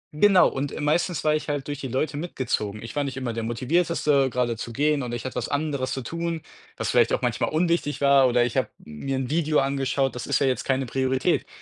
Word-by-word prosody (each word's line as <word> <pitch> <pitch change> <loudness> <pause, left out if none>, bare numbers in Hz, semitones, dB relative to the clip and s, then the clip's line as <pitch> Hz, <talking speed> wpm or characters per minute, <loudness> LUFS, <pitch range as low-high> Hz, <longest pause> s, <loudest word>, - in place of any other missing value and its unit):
genau, 190 +3 +6
und, 135 +1 -3
äh, - - -6
meistens 160 +2 0
war 155 - +3
ich 155 0 -2
halt 145 -2 -2
durch 145 -1 -4
die 135 - -4
Leute 135 +4 -1
mitgezogen. 115 - -3
Ich 115 - -8
war 145 - +1
nicht 135 -2 -4
immer 125 -3 -3
der 115 - -3
Motivierteste, 140 +3 +1
gerade 125 -2 0
zu 115 - -6
gehen 145 +4 +1
und 125 -2 -4
ich 120 +1 -5
hatte 130 - -5
was - - -2
anderes 145 -3 -1
zu 130 - -3
tun, 165 +4 -3 0.3
was - - -1
vielleicht - - +4
auch - - 0
manchmal - - 0
unwichtig 165 -2 0
war. 140 -1 +5
Oder 120 -1 +3
ich 120 - -4
habe - - +2
mir 105 - -5
'n 130 0 -3
Video 155 -1 +1
angeschaut, 135 0 +1
das 125 - -5
ist 140 - +2
ja 140 - +2
jetzt 130 -1 0
keine 135 0 +1
Priorität. 130 +1 0
135 Hz, 240 wpm, -25 LUFS, 130-150 Hz, 0.3 s, genau